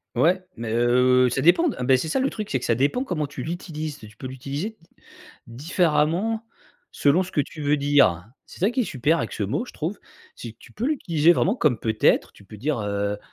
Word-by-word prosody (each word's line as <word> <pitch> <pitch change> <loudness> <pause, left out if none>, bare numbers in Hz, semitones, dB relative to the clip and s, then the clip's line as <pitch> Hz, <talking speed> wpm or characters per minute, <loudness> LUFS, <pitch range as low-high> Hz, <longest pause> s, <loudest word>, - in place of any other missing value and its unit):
Ouais, 170 +9 +3
mais 115 -1 -5
heu, 125 +2 +4
ça 135 - -1
dépend 175 - +4
de 285 - -2
ah - - -3
bah 130 +1 +4
c'est 145 - -3
ça 210 +12 0
le 270 - +1
truc, 215 -5 -6
c'est 135 - 0
que - - -6
ça 115 - +2
dépend 145 - +1
comment 155 - -2
tu 135 -2 -7
l'utilises. 155 -2 -5
Tu 110 0 -14
peux 130 - -7
l'utiliser 140 - -5
d 165 - -24 0.6
différemment, 170 - 0 0.5
selon 145 +6 +3
ce 185 - -10
que 145 - +2
tu 155 +3 -9
veux 145 0 +2
dire. 140 - +3 0.2
C'est - - -14
ça 200 +5 +3
qui 255 - 0
est - - +1
super 150 +2 +1
avec - - -3
ce - - -3
mot, 125 - -2
je - - -13
trouve. 170 +6 -4 0.4
C'est 115 -2 -8
que - - -42
tu - - -16
peux 230 - -3
l'utiliser 170 - +3
vraiment 190 +6 +1
comme: 145 - +2
«peut 110 -1 -2
être», - - +3
tu 100 - -18
peux 105 - -12
dire, 140 +3 -1
heu: 100 0 -2
145 Hz, 240 wpm, -24 LUFS, 125-175 Hz, 0.6 s, heu